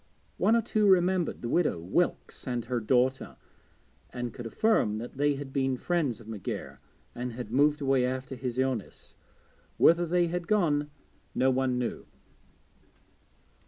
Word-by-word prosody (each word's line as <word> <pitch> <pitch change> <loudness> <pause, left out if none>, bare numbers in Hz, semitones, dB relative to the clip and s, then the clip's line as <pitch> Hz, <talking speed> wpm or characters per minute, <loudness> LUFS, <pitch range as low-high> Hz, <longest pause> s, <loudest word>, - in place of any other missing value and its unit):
One 225 - +3
or 230 - +2
two 215 -2 +1
remembered 185 -4 +2
the - - -2
widow 155 - +1
Wilkes 100 - -1
and 120 -2 -2
her 125 0 -1
daughter, 125 +4 +1 0.7
and 120 -1 -5
could 120 -3 -7
affirm 115 - +2
that 120 +4 -7
they 145 0 +2
had 135 -1 -7
been 135 -2 0
friends 150 -8 -1
of 115 - -14
McGair 95 -10 -6 0.3
and 125 0 -5
had 115 -2 -7
moved 145 +3 +3
away 135 -2 +2
after 130 +1 -3
his 125 -1 -4
illness. 130 -4 -3 0.6
Whither 170 +1 +5
they 175 +1 +2
had 170 0 -3
gone 150 -8 +2 0.5
no 130 +1 +3
one 130 -1 0
knew. 125 -1 -3
130 Hz, 150 wpm, -28 LUFS, 120-170 Hz, 0.7 s, Whither